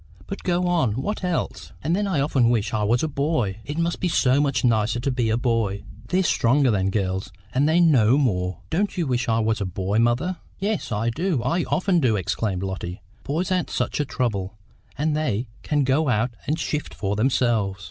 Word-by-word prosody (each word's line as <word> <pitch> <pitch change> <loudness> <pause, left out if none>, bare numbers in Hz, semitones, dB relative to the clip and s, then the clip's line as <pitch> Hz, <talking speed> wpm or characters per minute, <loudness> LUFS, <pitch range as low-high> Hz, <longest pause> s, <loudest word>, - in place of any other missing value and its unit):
"But 195 - -6
go 180 0 0
on; 170 -11 +2
what 190 - -3
else?" 180 -2 -3
"And 160 +4 +1
then 205 +1 0
I 170 -8 +1
often 135 -5 +2
wish 115 -3 0
I 110 - 0
was 115 +5 +2
a - - +1
boy. 140 -9 -1
It 145 +7 -5
must 170 +1 0
be 185 - 0
so 135 -4 +3
much 140 -2 0
nicer 115 -1 +2
to 135 +3 -1
be 120 -3 0
a 110 - +2
boy. 115 -5 0 0.2
They're 185 +6 +2
stronger 135 -4 +3
than 95 -2 +1
girls, 95 -2 -2 0.2
and 140 +4 +3
they 165 +2 +4
know 135 -8 +5
more. 90 - 0
Don't 200 +4 0
you 175 - +1
wish 125 -1 -1
I 110 - +3
was 110 -1 0
a - - 0
boy, 95 +3 -1
mother?" 125 +11 +1 0.2
"Yes, 205 - -2
I 110 +2 0
do, 160 -2 -1
I 165 +8 0
often 185 -1 +1
do!" 125 -7 +2
exclaimed 95 0 -1
Lotty. 95 -2 -4 0.2
"Boys 170 +6 -2
aren't 180 -2 0
such - - -2
a 145 - +1
trouble, 105 -7 -2 0.4
and 150 +1 0
they 125 -7 -1
can 145 -2 +1
go 135 +3 +2
out 120 +1 +1 0.2
and 155 - +1
shift 150 -2 -3
for 100 0 -2
themselves." 110 -4 +1
125 Hz, 210 wpm, -24 LUFS, 110-155 Hz, 0.4 s, know